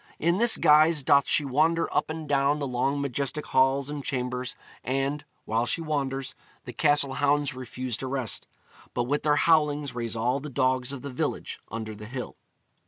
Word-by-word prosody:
In 170 Hz, +4 st, +1 dB
this 235 Hz, 0 st, +4 dB
guise 155 Hz, 0 st, +5 dB
doth 140 Hz, +1 st, +4 dB
she 150 Hz, -, +2 dB
wander 160 Hz, +5 st, +2 dB
up -, -, +1 dB
and 155 Hz, -1 st, -5 dB
down 140 Hz, +1 st, +2 dB
the 145 Hz, -, -3 dB
long 135 Hz, +2 st, 0 dB
majestic 140 Hz, +2 st, -1 dB
halls 135 Hz, +1 st, +2 dB
and 145 Hz, -1 st, -5 dB
chambers, 125 Hz, -1 st, -3 dB, 0.3 s
and, 135 Hz, +3 st, -1 dB, 0.2 s
while 115 Hz, +2 st, 0 dB
she -, -, 0 dB
wanders, 135 Hz, -4 st, -2 dB, 0.3 s
the 125 Hz, -, -7 dB
castle 145 Hz, -3 st, +2 dB
hounds 145 Hz, 0 st, +1 dB
refuse 125 Hz, -1 st, -5 dB
to 130 Hz, -, -5 dB
rest, 130 Hz, -4 st, -2 dB, 0.5 s
but 120 Hz, -, +1 dB
with 145 Hz, +5 st, -1 dB
their 150 Hz, -1 st, +3 dB
howlings 150 Hz, -3 st, +2 dB
raise 120 Hz, -1 st, -3 dB
all 125 Hz, +4 st, 0 dB
the 150 Hz, +2 st, -7 dB
dogs 130 Hz, -1 st, +1 dB
of 140 Hz, -2 st, -7 dB
the 140 Hz, -, -5 dB
village 125 Hz, -, -3 dB
under 110 Hz, 0 st, -5 dB
the 105 Hz, 0 st, -10 dB
hill. 125 Hz, +1 st, -6 dB
140 Hz, 180 wpm, -27 LUFS, 125-150 Hz, 0.5 s, guise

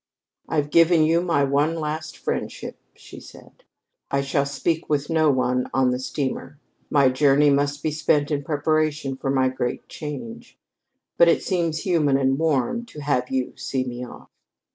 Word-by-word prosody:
"I've 150 Hz, -2 st, -1 dB
given 165 Hz, 0 st, +5 dB
you 165 Hz, +2 st, +3 dB
my 170 Hz, -5 st, +1 dB
one 145 Hz, +4 st, +1 dB
last 155 Hz, 0 st, -4 dB
friendship," -, -, -4 dB, 0.2 s
she -, -, -12 dB
said. -, -, -16 dB, 0.5 s
"I 140 Hz, -, +1 dB
shall 140 Hz, 0 st, 0 dB
speak 160 Hz, +4 st, -2 dB
with 145 Hz, +1 st, -1 dB
no 160 Hz, -1 st, +3 dB
one 125 Hz, -2 st, 0 dB
on 130 Hz, -1 st, +3 dB
the 125 Hz, -, -2 dB
steamer. 135 Hz, +1 st, -4 dB, 0.3 s
My 140 Hz, -3 st, +4 dB
journey 140 Hz, +2 st, +4 dB
must 145 Hz, +1 st, 0 dB
be 155 Hz, -, 0 dB
spent 150 Hz, -1 st, +1 dB
in 145 Hz, -1 st, -1 dB
preparation 155 Hz, -1 st, 0 dB
for 135 Hz, -, -4 dB
my 130 Hz, -1 st, +2 dB
great 130 Hz, -1 st, -3 dB
change. 230 Hz, +11 st, -8 dB, 0.6 s
But 170 Hz, -, +7 dB
it 165 Hz, -, +3 dB
seems 165 Hz, -4 st, -1 dB
human 155 Hz, -7 st, +2 dB
and 135 Hz, 0 st, +1 dB
warm 160 Hz, -, 0 dB
to 150 Hz, -9 st, -10 dB
have 125 Hz, -3 st, 0 dB
you 130 Hz, -1 st, -2 dB
see 130 Hz, -1 st, -2 dB
me 125 Hz, -1 st, -6 dB
off." 125 Hz, -, -12 dB
145 Hz, 165 wpm, -23 LUFS, 135-155 Hz, 0.6 s, But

